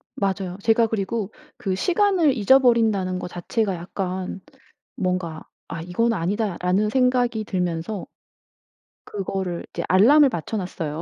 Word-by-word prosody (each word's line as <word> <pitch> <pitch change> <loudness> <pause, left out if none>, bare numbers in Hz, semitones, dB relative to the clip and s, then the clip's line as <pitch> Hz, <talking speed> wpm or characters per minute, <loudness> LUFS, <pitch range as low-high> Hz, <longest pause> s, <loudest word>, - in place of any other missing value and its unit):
맞아요. 190 -2 -2
제가 225 0 +4
그리고 215 0 -2 0.3
그 200 -7 -2
시간을 355 - +2
잊어버린다는 225 -6 +3
거 - - -5
자체가 190 +3 -2
약간 185 +2 -4 0.5
뭔가 180 -4 -2 0.2
'아 165 - -6
이건 205 +8 0
아니다.'라는 195 +1 0
생각이 245 -2 +2
들면서 180 0 -3 1.0
그거를 190 -3 -4
이제 170 - -3
알람을 270 +10 +6
맞춰 195 +4 -3
놨어요. 165 -5 -4
195 Hz, 290 characters per minute, -23 LUFS, 180-230 Hz, 1.0 s, 알람을